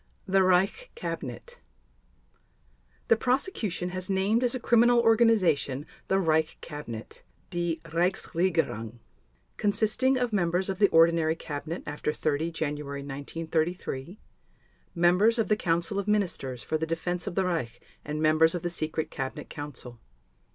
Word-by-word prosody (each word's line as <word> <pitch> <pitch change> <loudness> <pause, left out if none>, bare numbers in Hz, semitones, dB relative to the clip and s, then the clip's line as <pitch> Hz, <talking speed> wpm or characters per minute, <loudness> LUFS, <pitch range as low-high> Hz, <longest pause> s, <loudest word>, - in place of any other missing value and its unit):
THE 195 0 +3
REICH 190 - +2
CABINET 480 +1 -6 1.5
The - - +6
Prosecution 235 - -1
has 185 +1 -5
named 200 +5 +2
as 245 +1 +2
a - - -2
criminal 240 0 +4
organization 210 - +3 0.2
the 190 - +2
Reich 160 -4 +1
Cabinet 120 -8 -8 0.3
(Die 175 -1 -1
Reichsregierung) 165 - 0 0.6
consisting 220 +6 +2
of 245 -3 -1
members 180 0 +1
of 190 - -6
the 200 - +6
ordinary 165 -1 +4
cabinet 160 +1 -5
after 150 0 -2
30 155 +2 -1
January 145 -3 -4
1933, 160 +4 -3 0.8
members 180 +7 +4
of 225 - 0
the 210 - +4
Council 170 0 0
of 200 - -4
Ministers 175 - -1
for 155 - -1
the 160 - -2
Defense 175 +3 -2
of 185 - -4
the 190 - +2
Reich 140 -10 -2 0.2
and 150 +1 -4
members 155 +2 +4
of 175 - -4
the 175 - -1
Secret 160 -1 -2
Cabinet 135 +2 -5
Council. 130 -5 -7
175 Hz, 135 wpm, -28 LUFS, 155-200 Hz, 1.5 s, The